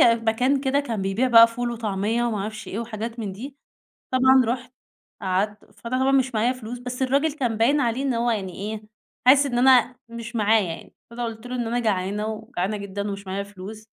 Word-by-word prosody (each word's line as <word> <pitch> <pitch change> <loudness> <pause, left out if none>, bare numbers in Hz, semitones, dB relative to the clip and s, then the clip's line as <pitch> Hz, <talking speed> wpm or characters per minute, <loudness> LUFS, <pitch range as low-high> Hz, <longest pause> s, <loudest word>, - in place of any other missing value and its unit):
مكان 235 +4 +3
كده 275 +1 +1
كان 225 -8 -3
بيبيع 200 +7 0
بقى 230 -1 +9
فول 240 +1 -3
وطعمية 220 0 -1
وما 225 -3 -1
اعرفش 215 +2 -5
إيه 205 - -4
وحاجات 230 0 -5
من 210 -4 -4
دي، 265 +8 -9 0.6
طبعًا 260 0 +5
رُحت، 250 +2 -3 0.5
قعدت، 200 +3 -1
فأنا 245 +2 -3
طبعًا 265 +1 +3
مش 265 -2 +2
معايا 230 +4 +2
فلوس 245 -1 -7
بس 250 +1 -5
الراجل 280 +4 +2
كان 245 -7 -2
باين 275 +7 +3
عليه 240 +1 0
إن 270 -3 0
هو 235 +1 +1
يعني 195 -5 -2
إيه 210 +2 -5 0.4
حاسس 280 +2 +7
إن 240 -3 -1
أنا 250 -1 +5
مش 235 +1 -7
معايا 215 -1 +3
يعني، - - -15 0.2
فأنا 240 +1 -4
قلت 225 0 -6
له 250 0 -4
إن 240 -2 -2
أنا 240 +2 -1
جعانة 205 -1 -1
وجعانة 215 -2 -3
جدًا 200 0 -4
ومش 200 0 -7
معايا 195 +1 -3
فلوس 205 +2 -10
230 Hz, 200 wpm, -24 LUFS, 210-250 Hz, 0.6 s, بقى